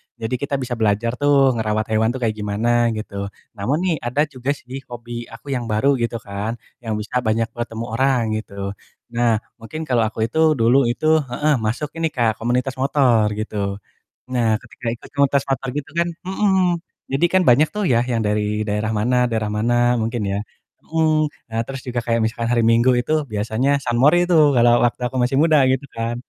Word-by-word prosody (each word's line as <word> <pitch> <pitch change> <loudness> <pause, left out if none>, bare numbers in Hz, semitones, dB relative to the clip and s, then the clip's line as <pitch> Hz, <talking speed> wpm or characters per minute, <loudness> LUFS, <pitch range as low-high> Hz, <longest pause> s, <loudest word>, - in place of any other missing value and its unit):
Jadi 115 +3 -3
kita 140 0 -2
bisa 125 -2 -3
belajar 110 +2 +1
tuh 140 -2 +4
ngerawat 110 0 -1
hewan 110 0 +2
tuh 130 - -4
kayak 110 - +2
gimana 115 +4 +1
gitu. 100 -2 -5 0.3
Namun 115 +9 -1
nih 180 -3 +1
ada 140 +5 +2
juga 135 0 -3
sih 130 0 -8
hobi 120 0 -7
aku 115 +5 -10
yang 125 -3 -2
baru 125 +5 +2
gitu 115 0 -1
kan 100 +3 -3 0.3
yang 110 -2 -2
bisa 115 +4 -2
banyak 115 +1 +1
bertemu 115 -1 -5
orang 130 +2 +2 0.2
gitu. 110 - -12 0.6
Nah 120 -2 +2 0.2
mungkin 155 +8 -6
kalau 120 -3 +2
aku 110 - -8
itu 160 - -3 0.2
dulu 120 +3 +4
itu 120 +6 -2
heeh, 145 +2 0
masuk 115 +7 -2
ini 165 - +1
Kak 115 -3 +1
komunitas 125 +3 -1
motor 130 -5 +3
gitu. 110 0 -5 0.8
Nah 120 -2 +2
ketika 120 +1 -14
ikut - - -15
komunitas 140 -1 +3
motor 135 0 -1
gitu 145 - -4
kan 170 - +2 0.2
mhm, 190 -3 +2 0.3
jadi 135 +5 +2
kan 185 - +5
banyak 140 +6 +5
tuh 210 - -1
ya 120 -2 +4
yang 115 -1 0
dari 105 0 0
daerah 105 +1 -1
mana 125 +4 +1
daerah 110 -2 -1
mana 115 +3 +1 0.3
mungkin 115 +1 -2
ya, 100 - -1 0.5
mhm. 155 -1 +2 0.2
Nah 110 0 -2
terus 135 0 -6
juga 120 -1 -1
kayak 115 -1 +1
misalkan 115 +1 -2
hari 120 - +3
Minggu 120 +2 +4
itu 125 - -3 0.2
biasanya 110 +5 -1
sunmori 130 +8 +4
itu 175 - +4 0.2
kalau 120 0 +5
waktu 120 - -1
aku 130 - -10
masih 125 +2 +1
muda 160 -1 +4
gitu 130 +2 -1
kan. 115 +1 -2
120 Hz, 185 wpm, -21 LUFS, 110-135 Hz, 0.8 s, kan